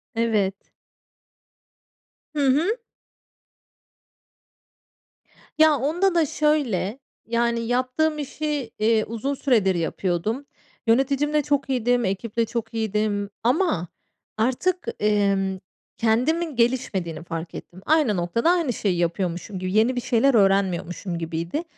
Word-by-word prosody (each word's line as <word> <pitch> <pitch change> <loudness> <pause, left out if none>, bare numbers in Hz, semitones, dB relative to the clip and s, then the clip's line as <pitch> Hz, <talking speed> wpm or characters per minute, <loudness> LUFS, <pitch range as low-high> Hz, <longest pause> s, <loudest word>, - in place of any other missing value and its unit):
Evet. 215 -4 +1 1.8
Hı 285 -2 +2
hı. 295 +8 +3 2.9
Ya 310 -1 +6
onda 345 +8 +1
da 330 -2 +4
şöyle, 275 -8 0 0.3
yani, 235 0 +1
yaptığım 255 +6 0
işi, 290 -3 -3
eee, 220 0 +3
uzun 230 +5 -3
süredir 225 -9 +2
yapıyordum. 180 - -1 0.4
Yöneticimle 275 +5 +2
çok 285 -1 0
iyiydim, 245 -2 +1
ekiple 220 +4 -1
çok 225 0 -4
iyiydim 210 -2 -1
ama 245 - +1 0.5
artık, 260 +11 0
emm, 200 -2 +1 0.4
kendimin 275 +8 +1
gelişmediğini 210 -10 0
fark 165 0 -6
ettim. 185 +2 -10
Aynı 295 - +3
noktada, 175 - +1
aynı 335 -9 +1
şeyi 195 -4 -1
yapıyormuşum 175 +3 -2
gibi 185 +1 -3
yeni 225 +4 +3
bir 245 - -1
şeyler 255 +3 +3
öğrenmiyormuşum 195 -3 +1
gibiydi 165 - -3
230 Hz, 105 wpm, -24 LUFS, 195-280 Hz, 2.9 s, Ya